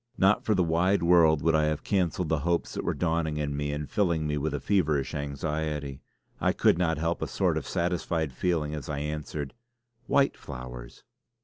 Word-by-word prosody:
Not 95 +2 +4
for 110 - +2
the 90 - +3
wide 85 +4 +2
world 85 -3 +5
would 80 +1 +3
I 75 -1 +3
have 75 -1 -1
cancelled 90 -3 0
the 80 -1 +1
hopes 85 +3 -1
that - - -3
were - - -1
dawning 80 -3 0
in 75 -1 -2
me 75 0 -2
and 75 0 -4
filling 85 -6 +1
me 75 0 0
with 75 +1 -1
a - - -2
feverish 80 -9 +1
anxiety. 75 -1 -3 0.4
I - - +2
could - - +3
not 80 -2 +1
help 85 +2 -1
a - - -1
sort - - +1
of - - -3
satisfied 85 -4 -1
feeling 75 +1 -1
as 75 -3 -6
I 75 - -2
answered: 75 -1 -4 0.5
"White 140 -1 +3
flowers!" 60 -3 -9
80 Hz, 195 wpm, -28 LUFS, 75-85 Hz, 0.5 s, world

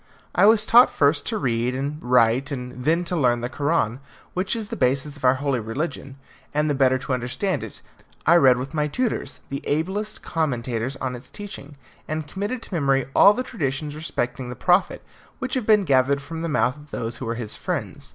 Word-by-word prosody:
I 200 - +5
was 215 -1 +5
taught 240 +3 +7
first 145 0 +2
to 220 - -1
read 120 - 0
and 145 +4 -3
write, 125 +2 +3
and 125 -1 -6
then 165 +3 +2
to 180 - -2
learn 125 -6 +2
the 120 - -3
Koran, 140 -5 0 0.3
which 185 +5 -1
is 220 -2 -5
the - - -4
basis 140 +3 0
of 145 - -16
our 130 0 +5
holy 140 -2 -1
religion, 135 +4 -4 0.4
and 150 0 +2
the 145 - +1
better 130 -1 +3
to 130 +1 -4
understand 130 +10 -2
it, - - -10 0.4
I 160 - +6
read 130 -5 +6
with 130 +4 -5
my 150 -1 0
tutors 240 - -2
the 140 - -4
ablest 190 +8 -2
commentators 125 -5 -2
on 130 -2 -3
its 125 - -12
teaching, 155 -8 -9 0.3
and 155 -1 -3
committed 205 +8 -4
to - - -9
memory 135 -5 +1
all 200 +1 +7
the 255 - -2
traditions 150 - -3
respecting 125 -5 -3
the 125 - -6
Prophet, 180 +9 +2 0.3
which 255 0 -4
have 255 -5 -1
been 210 -2 +5
gathered 140 -2 +3
from 160 +4 -7
the 165 - -2
mouth 125 0 +1
of 150 0 -15
those 115 -3 -4
who 130 - -6
were 115 - -2
his 115 -3 -5
friends. - - -4
140 Hz, 205 wpm, -23 LUFS, 125-170 Hz, 0.4 s, taught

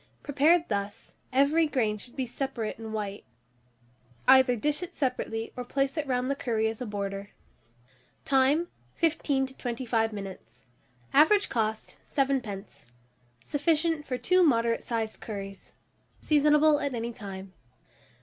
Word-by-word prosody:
Prepared 310 +4 +3
thus, 200 -1 -4 0.2
every 285 +5 +3
grain 230 -7 0
should 245 +3 -11
be 260 - -1
separate 245 -3 -4
and 220 -1 -7
white. 205 -2 -4 1.0
Either 260 -1 +7
dish 295 - -1
it 360 - -7
separately, 240 -4 -2
or 250 - -4
place 275 +2 -1
it 305 -3 -2
round 250 -1 0
the 275 - +1
curry 225 -5 0
as 225 +2 -4
a 250 - -3
border. 200 -1 -4 1.0
Time. 275 +5 +3 0.3
15 295 -4 +1
to 265 0 -11
25 235 -2 -1
minutes. 185 - -9 0.5
Average 395 +8 +5
cost, 220 -2 -2
7d. 255 -8 -2 0.6
Sufficient 310 +1 0
for 255 - -2
2 365 +7 +3
moderate 230 -8 +3
sized 225 -2 -3
curries. 195 -2 -7 0.5
Seasonable 300 0 +4
at 280 -3 -2
any 235 +1 -3
time. 195 -3 -8
250 Hz, 130 wpm, -28 LUFS, 220-290 Hz, 1.0 s, Either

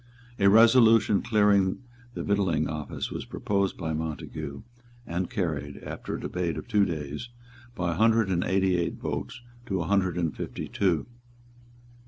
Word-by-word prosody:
A 100 0 +5
resolution 115 -1 +6
clearing 105 -2 +2 0.3
the - - -3
Victualling 95 -7 +1
Office 75 -2 -4
was - - -4
proposed 100 -1 -1
by 80 -1 -3
Montague, 75 -1 -5 0.4
and 90 +2 -3
carried, 80 - -3
after - - -5
a - - -5
debate 90 -2 -2
of - - -7
two 105 -3 +3
days, 75 - -5 0.5
by 90 -5 -1
a 80 - -3
hundred 115 -1 +3
and 90 -2 +1
eighty 95 -1 +2
eight 85 - -1
votes - - -5 0.3
to 95 -2 -1
a 85 - -2
hundred 95 -2 +1
and 80 -6 -1
fifty - - -5
two. 90 -6 0
95 Hz, 155 wpm, -27 LUFS, 80-105 Hz, 0.5 s, resolution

